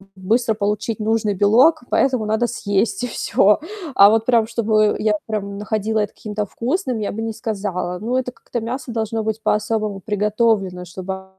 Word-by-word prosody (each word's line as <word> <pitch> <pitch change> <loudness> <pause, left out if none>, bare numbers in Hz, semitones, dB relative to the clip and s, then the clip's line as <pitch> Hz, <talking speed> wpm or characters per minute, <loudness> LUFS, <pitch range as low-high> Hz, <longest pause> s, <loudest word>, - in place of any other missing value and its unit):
быстро 220 +5 +1
получить 210 +1 -2
нужный 215 -1 +1
белок, 240 - +4
поэтому 255 -5 +2
надо 220 +3 +1
съесть- 215 +1 -1
и - - 0
всё. 210 -3 +2 0.4
А 200 +1 +8
вот 225 +1 +2
прям 230 -3 +3
чтобы 215 -2 +2
я 210 -1 +2
прям 200 -2 -3
находила 215 +1 -1
это 210 - -1
каким-то 210 -1 -4
вкусным, 250 - -2
я 205 - -2
бы 220 - -5
не 225 0 -3
сказала. 195 -5 -3
Ну, 235 +4 -2
это 255 -1 -1
как-то 240 - -6
мясо 250 +3 -5
должно 225 0 -2
быть 220 0 -3
по-особому 215 -2 0
приготовлено, 210 -3 0
чтобы 190 +2 -6
215 Hz, 170 wpm, -20 LUFS, 205-230 Hz, 0.4 s, А